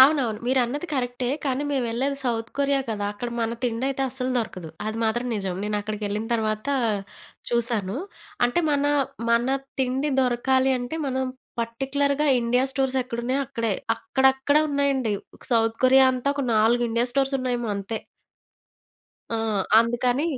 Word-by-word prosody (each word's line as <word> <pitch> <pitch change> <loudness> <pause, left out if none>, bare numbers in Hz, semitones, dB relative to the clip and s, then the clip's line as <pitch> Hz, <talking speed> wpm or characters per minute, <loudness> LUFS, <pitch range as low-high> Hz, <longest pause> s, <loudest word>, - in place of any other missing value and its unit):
అవునవును. 260 -6 +5
మీరు 260 +1 +3
అన్నది 290 +8 -4
కరక్టే, 245 -2 -1 0.2
కానీ 270 0 0
మేవెళ్ళేది 265 +1 0
సౌత్ 230 -1 -1
కొరియా 280 0 +2
కదా! 205 -1 -2
అక్కడ 240 +4 -5
మన 230 +1 0
తిండయితే 260 +3 -1
అస్సలు 255 0 -2
దొరకదు. 185 -8 -4 0.2
అది 220 +1 -3
మాత్రం 240 +3 0
నిజం. 190 -3 -2
నేను 210 0 -1
అక్కడికెళ్ళిన 210 +1 -3
తర్వాతా 220 +5 -1 0.8
చూశాను. 235 -3 0 0.5
అంటే, 245 +8 +1
మనా 290 0 +2 0.4
మన 235 +2 +3 0.3
తిండి 265 +3 0
దొరకాలి 260 +1 +2
అంటే 245 +6 -4
మనం 260 0 0 0.4
పార్టిక్యులర్‌గా 280 +5 0
ఇండియా 245 +2 +2
స్టోర్సెక్కడున్నాయో 260 -1 -1
అక్కడే. 230 -6 -1 0.2
అక్కడక్కడ 265 +3 +2
ఉన్నాయండి. 275 -5 +1 0.2
ఒక - - -19
సౌత్ 225 0 +2
కొరియా 265 +1 +7
అంతా 255 +2 -2
ఒక 280 - -1
4 225 +3 +4
ఇండియా 235 +1 +1
స్టోర్సున్నాయేమో 255 -3 0
అంతే. 200 +3 -4 1.3
ఆ! 230 - +1 0.4
అందుకని 245 +4 +1
245 Hz, 135 wpm, -25 LUFS, 230-270 Hz, 1.3 s, కొరియా